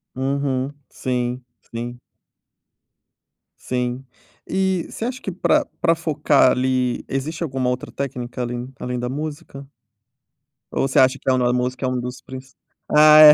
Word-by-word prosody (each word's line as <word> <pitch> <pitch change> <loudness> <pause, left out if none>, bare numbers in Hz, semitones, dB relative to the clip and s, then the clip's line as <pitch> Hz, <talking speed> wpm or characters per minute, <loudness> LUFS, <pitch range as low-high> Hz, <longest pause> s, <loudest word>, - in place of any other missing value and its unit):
Uhum. 135 0 0 0.2
Sim, 125 0 -2 0.3
sim. 120 +1 -5 1.6
Sim. 125 +1 -2 0.4
E 190 -2 0
você 225 - -4
acha 255 +2 -4
que 190 - -3
pra 295 - +2
pra 165 -1 +4
focar, 150 -4 +3
ali, 125 -1 +1
existe 150 +5 -2
alguma 130 -5 -1
outra 125 0 -3
técnica 125 -2 -4
além 120 +1 -3
além 125 0 -3
da 125 - -2
musica? 145 0 -5 1.1
Ou - - +1
você 130 - +3
acha 130 +1 +5
que - - -2
é - - +5
o - - +3
nor 125 -1 +2
a - - +2
musica 125 +1 -1
é - - +1
um 130 -1 -1
dos 125 +1 -5
princ 130 0 -10 0.4
ah 155 0 +9
é. 155 -1 +12
130 Hz, 160 wpm, -22 LUFS, 125-150 Hz, 1.6 s, é